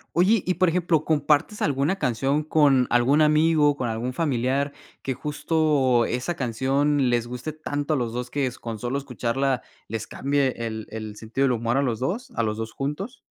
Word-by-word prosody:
Oye, 190 Hz, +4 st, +4 dB
y, 185 Hz, -, +1 dB
por 185 Hz, +1 st, +3 dB
ejemplo, 165 Hz, -2 st, +1 dB
¿compartes 150 Hz, +6 st, +1 dB
alguna 145 Hz, +6 st, +1 dB
canción 135 Hz, -, 0 dB
con 145 Hz, -4 st, +4 dB
algún 125 Hz, +5 st, +3 dB
amigo, 155 Hz, -1 st, +4 dB
con 125 Hz, -, -2 dB
algún 115 Hz, +2 st, -2 dB
familiar 140 Hz, -1 st, 0 dB, 0.3 s
que 135 Hz, -, -1 dB
justo 145 Hz, -3 st, +1 dB
esa 125 Hz, +9 st, -2 dB
canción 135 Hz, +3 st, +1 dB
les 120 Hz, -1 st, +1 dB
guste 125 Hz, +5 st, -5 dB
tanto 145 Hz, -1 st, -3 dB
a -, -, +1 dB
los 120 Hz, -3 st, -2 dB
2 125 Hz, +1 st, -4 dB
que 140 Hz, 0 st, -1 dB
s 125 Hz, -1 st, -5 dB
con 115 Hz, -2 st, -5 dB
solo 120 Hz, +5 st, -2 dB
escucharla 135 Hz, -1 st, -1 dB, 0.3 s
les 110 Hz, 0 st, -4 dB
cambie 140 Hz, -1 st, 0 dB
el 110 Hz, -2 st, -4 dB
el 110 Hz, -1 st, -6 dB
sentido 115 Hz, +5 st, -1 dB
del 130 Hz, -, +2 dB
humor 115 Hz, +2 st, 0 dB
a -, -, +3 dB
los 120 Hz, -5 st, -1 dB
2, 220 Hz, -, -2 dB
a -, -, +1 dB
los 110 Hz, -1 st, -1 dB
2 110 Hz, 0 st, -5 dB
juntos? 150 Hz, -, -4 dB
135 Hz, 190 wpm, -24 LUFS, 120-150 Hz, 0.3 s, Oye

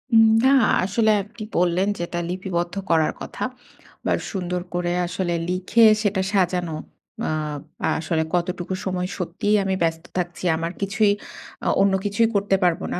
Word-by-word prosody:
উম 225 Hz, 0 st, +8 dB, 0.2 s
না 265 Hz, -, +6 dB, 0.3 s
আসলে 215 Hz, +3 st, +2 dB
আপনি 215 Hz, +2 st, -10 dB
বললেন 180 Hz, +2 st, +2 dB
যেটা 175 Hz, 0 st, -3 dB
লিপিবদ্ধ 180 Hz, -1 st, -2 dB
করার 160 Hz, -2 st, +3 dB
কথা -, -, -6 dB, 0.6 s
বা, -, -, +1 dB, 0.2 s
সুন্দর 180 Hz, -2 st, -2 dB
করে 175 Hz, 0 st, -1 dB, 0.2 s
আসলে 175 Hz, 0 st, -2 dB, 0.2 s
লিখে 185 Hz, +5 st, +2 dB, 0.2 s
সেটা 205 Hz, -3 st, +1 dB
সাজানো। 180 Hz, -4 st, +1 dB, 0.6 s
আব 150 Hz, -2 st, -3 dB, 0.4 s
আসলে 160 Hz, 0 st, 0 dB
কতটুকু 175 Hz, +1 st, -2 dB
সময় 180 Hz, -1 st, -1 dB
সত্যিই 190 Hz, +4 st, 0 dB
আমি 190 Hz, 0 st, 0 dB
ব্যস্ত 165 Hz, 0 st, 0 dB
থাকছি। 175 Hz, 0 st, -3 dB
আমার 165 Hz, +1 st, -2 dB
কিছুই 200 Hz, +1 st, +2 dB, 0.5 s
আ -, -, 0 dB
অন্য 195 Hz, -1 st, +4 dB
কিছুই 210 Hz, +3 st, +2 dB
করতে 200 Hz, -1 st, +2 dB
পারবো 175 Hz, +1 st, +2 dB
না। -, -, -2 dB
180 Hz, 150 wpm, -23 LUFS, 175-200 Hz, 0.6 s, উম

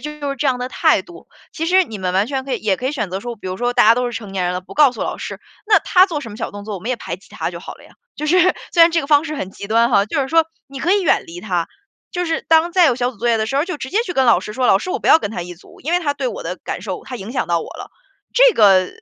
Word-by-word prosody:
就 300 Hz, -, -5 dB, 0.2 s
是 275 Hz, -, -4 dB
这 295 Hz, -, -1 dB
样 255 Hz, -2 st, +1 dB
的 250 Hz, +1 st, -4 dB
态 -, -, +2 dB
度， -, -, -15 dB, 0.2 s
其 325 Hz, 0 st, -3 dB
实 370 Hz, +2 st, +4 dB
你 220 Hz, -9 st, -8 dB
们 185 Hz, -1 st, -2 dB
完 200 Hz, +3 st, +2 dB
全 265 Hz, -1 st, -3 dB
可 270 Hz, -, -1 dB
以 -, -, -3 dB
也 200 Hz, -3 st, +1 dB
可 255 Hz, -, -3 dB
以 275 Hz, -, -1 dB
选 215 Hz, -10 st, -3 dB
择 190 Hz, +1 st, -4 dB
说， 240 Hz, +1 st, -6 dB
比 200 Hz, -, -10 dB
如 185 Hz, 0 st, -4 dB
说 245 Hz, 0 st, -1 dB
大 245 Hz, -3 st, +5 dB
家 225 Hz, -, +7 dB
都 250 Hz, +1 st, -1 dB
是 240 Hz, -, -4 dB
成 205 Hz, -3 st, -8 dB
年 190 Hz, -2 st, -1 dB
人 180 Hz, 0 st, -1 dB
了， 180 Hz, -, -3 dB
不 -, -, -13 dB
告 290 Hz, -3 st, +5 dB
诉 245 Hz, -, -6 dB
老 -, -, -4 dB
师， -, -, -6 dB, 0.3 s
那 420 Hz, -2 st, +5 dB
他 370 Hz, +1 st, +4 dB
做 320 Hz, -6 st, -4 dB
什 230 Hz, -, -8 dB
么 205 Hz, -, -9 dB
小 -, -, -4 dB
动 205 Hz, 0 st, -9 dB
作， 210 Hz, -, -5 dB
我 185 Hz, -, -7 dB
们 225 Hz, -, -6 dB
也 255 Hz, -, 0 dB
排 -, -, -6 dB
挤 -, -, -22 dB
他 -, -, -4 dB
就 -, -, -8 dB
好 -, -, -9 dB
了 -, -, -18 dB
呀。 -, -, -18 dB, 0.3 s
就 305 Hz, -, -4 dB
是， 360 Hz, +4 st, +3 dB, 0.3 s
虽 340 Hz, -, +6 dB
然 335 Hz, -, +7 dB
这 330 Hz, 0 st, +1 dB
个 -, -, -6 dB
方 290 Hz, 0 st, +4 dB
式 310 Hz, -1 st, -4 dB
很 190 Hz, -7 st, -5 dB
极 200 Hz, -, -9 dB
端 230 Hz, +2 st, +3 dB
哈， 200 Hz, -2 st, +3 dB
就 280 Hz, -, -1 dB
是 265 Hz, -, -4 dB
说 325 Hz, 0 st, +3 dB, 0.2 s
你 275 Hz, -1 st, -9 dB
可 360 Hz, -, +2 dB
以 405 Hz, -1 st, +2 dB
远 320 Hz, -, +2 dB
离 175 Hz, +1 st, -9 dB
他， 180 Hz, -5 st, -2 dB, 0.5 s
就 355 Hz, 0 st, -2 dB
是 325 Hz, -1 st, -2 dB
当 325 Hz, +1 st, +4 dB
再 355 Hz, -1 st, +5 dB
有 260 Hz, -, +3 dB
小 245 Hz, 0 st, -1 dB
组 240 Hz, -, -18 dB
作 240 Hz, -, -2 dB
业 230 Hz, -, +3 dB
的 220 Hz, -, 0 dB
时 255 Hz, +5 st, -3 dB
候， 290 Hz, -, +2 dB
就 360 Hz, -4 st, -5 dB
直 260 Hz, -, -7 dB
接 405 Hz, -, +1 dB
去 360 Hz, -, -3 dB
跟 265 Hz, -, +2 dB
老 235 Hz, -, +5 dB
师 210 Hz, -, -7 dB
说： 255 Hz, +2 st, 0 dB
“老 195 Hz, -, +5 dB
师 370 Hz, -, -7 dB
我 410 Hz, -, -2 dB
不 -, -, -1 dB
要 320 Hz, -, +8 dB
跟 205 Hz, -, -5 dB
他 175 Hz, -, -4 dB
一 175 Hz, 0 st, -8 dB
组， 170 Hz, -, -18 dB
因 320 Hz, +5 st, -3 dB
为 355 Hz, -, +4 dB
他 290 Hz, -5 st, -1 dB
对 -, -, -2 dB
我 -, -, -7 dB
的 -, -, -4 dB
感 -, -, -5 dB
受 -, -, -6 dB
他 250 Hz, -, -7 dB
影 215 Hz, +2 st, -8 dB
响 260 Hz, -, -2 dB
到 170 Hz, -1 st, +2 dB
我 -, -, -6 dB
了。” -, -, -9 dB, 0.4 s
这 -, -, +5 dB
个 190 Hz, -4 st, +5 dB
250 Hz, 380 characters per minute, -19 LUFS, 205-320 Hz, 0.5 s, 要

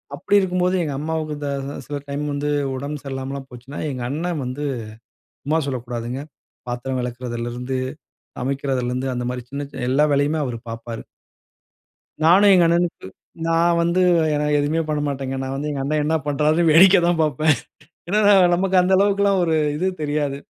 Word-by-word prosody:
அப்டி 190 Hz, +6 st, 0 dB
இருக்கும்போது, 180 Hz, -1 st, +1 dB
எங்க 150 Hz, -3 st, -3 dB
அம்மாவுக்கு 155 Hz, 0 st, -3 dB
இந்த 145 Hz, -1 st, -4 dB, 0.2 s
த 140 Hz, -, -5 dB
சில 145 Hz, -, -4 dB
டைம் 145 Hz, +1 st, -3 dB
வந்து 145 Hz, +1 st, -2 dB, 0.3 s
உடம்பு 140 Hz, +3 st, -5 dB
சரியில்லாமலாம் 135 Hz, 0 st, -5 dB
போச்சுனா, 125 Hz, +3 st, -10 dB
எங்க 130 Hz, -2 st, -5 dB
அண்ணே 165 Hz, +6 st, -2 dB
வந்து, 130 Hz, +4 st, -4 dB, 0.8 s
சும்மா 155 Hz, +3 st, +1 dB
சொல்லக்கூடாதுங்க. 125 Hz, -1 st, -4 dB, 0.5 s
பாத்திரம் 125 Hz, +2 st, -3 dB
வெளக்கறதுலருந்து, 120 Hz, +1 st, -4 dB, 0.6 s
சமைக்கிறதுலருந்து 130 Hz, -1 st, -2 dB
அந்த 125 Hz, -, -3 dB
மாதிரி 125 Hz, 0 st, -4 dB
சின்ன, 140 Hz, +1 st, -4 dB
சின்ன 125 Hz, -, -5 dB
எல்லா 145 Hz, +3 st, +4 dB
வேலையுமே 145 Hz, +3 st, +2 dB
அவரு 120 Hz, -2 st, -4 dB
பாப்பாரு. 115 Hz, 0 st, -6 dB, 1.2 s
நானு 185 Hz, +5 st, +6 dB
எங்க 180 Hz, -2 st, +6 dB
அண்ணனுக்கு, 170 Hz, -, 0 dB, 0.4 s
நான் 170 Hz, +1 st, +3 dB
வந்து 170 Hz, +2 st, +2 dB, 0.3 s
என்ன, 150 Hz, 0 st, 0 dB
எதுமே 150 Hz, +3 st, +1 dB
பண்ண 150 Hz, -1 st, 0 dB
மாட்டேங்க. 135 Hz, -1 st, -3 dB
நான் 135 Hz, 0 st, -4 dB
வந்து 145 Hz, +2 st, -3 dB
எங்க 140 Hz, -2 st, -3 dB
அண்ணே 150 Hz, +3 st, 0 dB
என்ன 155 Hz, +2 st, +1 dB
பண்றாருனு 150 Hz, +4 st, +2 dB
வேடிக்க 190 Hz, +4 st, +7 dB
தான் 175 Hz, -1 st, +1 dB
பாப்பேன். 155 Hz, 0 st, +2 dB, 0.5 s
ஏன்னா 210 Hz, +4 st, +2 dB, 0.3 s
நமக்கு 190 Hz, +1 st, +1 dB
அந்த 180 Hz, +1 st, +1 dB
அளவுக்கெல்லாம் 200 Hz, 0 st, +3 dB
ஒரு 165 Hz, -2 st, +1 dB, 0.2 s
இது 180 Hz, +5 st, -1 dB, 0.2 s
தெரியாது. 145 Hz, -2 st, -1 dB
145 Hz, 155 wpm, -21 LUFS, 130-165 Hz, 1.2 s, வேடிக்க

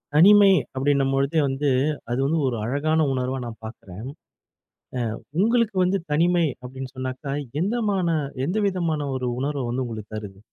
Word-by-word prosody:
தனிமை 200 Hz, +4 st, +8 dB, 0.3 s
அப்பிடின்னும்பொழுது 135 Hz, +1 st, +1 dB
வந்து, 135 Hz, +2 st, 0 dB, 0.4 s
அது 120 Hz, -, 0 dB
வந்து 160 Hz, +4 st, +1 dB
ஒரு 125 Hz, -, -1 dB
அழகான 155 Hz, +6 st, +1 dB
உணர்வா 130 Hz, +1 st, -1 dB
நான் 115 Hz, -2 st, -8 dB
பார்க்கிறேன். 110 Hz, 0 st, -9 dB, 1.1 s
அ -, -, -12 dB, 0.2 s
உங்களுக்கு 230 Hz, 0 st, +2 dB
வந்து 190 Hz, +2 st, +1 dB
தனிமை 170 Hz, +3 st, +3 dB, 0.2 s
அப்பிடின்னு 130 Hz, +1 st, -8 dB
சொன்னாக்க, 130 Hz, +2 st, -4 dB, 0.2 s
எந்தமான 195 Hz, -6 st, +1 dB, 0.3 s
எந்த 180 Hz, +8 st, -1 dB
விதமான 165 Hz, -6 st, -1 dB
ஒரு 130 Hz, -1 st, -2 dB
உணர்வு 140 Hz, -1 st, -2 dB
வந்து 125 Hz, +2 st, -1 dB
உங்களுக்கு 110 Hz, -2 st, -7 dB
தருது? 100 Hz, -2 st, -8 dB
140 Hz, 135 wpm, -24 LUFS, 130-175 Hz, 1.1 s, தனிமை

